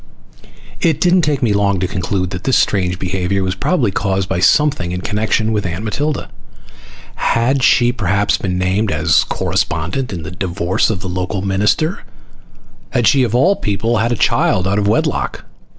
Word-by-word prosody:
It 165 -5 +2
didn't 180 0 +3
take 145 -4 0
me 110 -4 +2
long 100 -1 +1
to 95 - -1
conclude 95 0 -2
that 90 +1 -6
this 130 - +3
strange 90 -3 +1
behavior 95 +1 -1
was 95 0 -1
probably 120 - 0
caused 95 -1 -1
by 95 -2 -1
something 140 -7 +2
in 90 - -4
connection 110 +2 0
with 105 -2 -1
Aunt 90 +2 -4
Matilda. 145 +6 -3 0.8
Had 125 +4 +1
she 120 -2 +4
perhaps 100 -3 0
been 90 -2 -3
named 95 +4 0
as 80 +2 +3
corespondent 90 +11 -2
in 85 -4 -5
the 75 - -7
divorce 90 0 -1
of 100 -4 -2
the 95 - -5
local 95 +2 -3
minister? 105 - 0 0.9
Had 120 - 0
she, 140 - +4
of 120 -2 0
all 180 +11 +4
people, 115 - -1
had 115 +2 0
a - - +1
child 95 -3 +1
out 100 +2 +1
of 100 - 0
wedlock? 105 - -1
100 Hz, 175 wpm, -17 LUFS, 95-120 Hz, 0.9 s, she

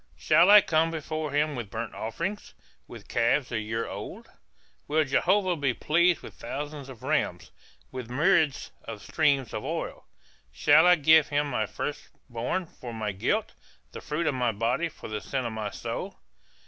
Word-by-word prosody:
Shall - - +4
I 210 0 +10
come 160 -2 +2
before 155 -1 -4
him 145 +1 0
with 120 -5 -5
burnt 115 +2 -5
offerings, 170 - -5 0.3
With - - -11
calves 120 +3 +1
a 120 - -1
year 110 +1 -3
old? - - -8 0.6
Will 155 +2 +2
Jehovah 185 +6 +2
be 135 -5 0
pleased 170 +2 +2
with - - -10
thousands 145 -1 -6
of 125 -4 -12
rams, - - -1 0.4
With 125 -3 -7
myriads 150 +2 +2
of 110 -2 -8
streams 140 -6 +1
of - - -4
oil? - - -5 0.4
Shall 150 - +5
I 180 - +7
give 155 -1 +5
him 145 0 0
my 110 -3 0
first 145 - -5 0.2
born 125 +11 -2
for 120 -7 -10
my 110 -2 -2
guilt, 95 0 -1 0.4
The - - -8
fruit 155 +3 -2
of 145 - +1
my 125 -2 +1
body 120 +10 0
for - - -11
the 110 -1 -4
sin 130 -2 -3
of 115 - -3
my 110 -1 -3
soul? - - -5
145 Hz, 175 wpm, -27 LUFS, 115-160 Hz, 0.6 s, I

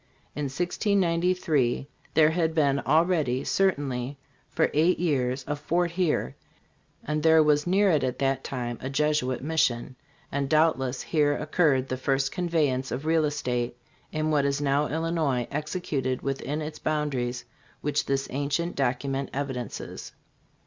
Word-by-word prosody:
In 150 - -2
1693 170 - +1 0.3
there 155 0 +6
had 160 -1 0
been 140 -3 +3
already, 155 -4 +2
certainly 140 -8 0 0.3
for - - +1
eight 165 +5 +3
years, 135 -6 0
a 145 - -1
fort 170 +4 0
here, 170 - 0 0.7
and 150 +1 -1
there 160 0 +6
was 150 +1 +2
near 195 +2 +4
it 150 -5 +2
at 130 -1 -1
that 135 -1 0
time 120 -3 -4
a 130 - -4
Jesuit 140 -3 0
mission; 135 -5 0 0.4
and 140 -1 -1
doubtless 140 -5 +2
here 145 -2 +2
oc 150 +1 -7
curred 135 -7 +3
the 130 - -3
first 135 +1 0
conveyance 155 -8 0
of 130 +6 -4
real 160 -1 +3
estate 125 -5 -2 0.3
in 155 0 -1
what 145 -2 +3
is 140 0 0
now 145 +1 +1
Illinois 160 -6 0
executed 145 -4 -2
within 140 +2 -2
its 150 0 -6
boundaries, 135 -5 -2 0.4
which 145 0 -1
this 135 0 0
ancient 145 +5 -1
document 135 +1 -1
evidences. 130 -4 -5
145 Hz, 140 wpm, -27 LUFS, 130-160 Hz, 0.7 s, there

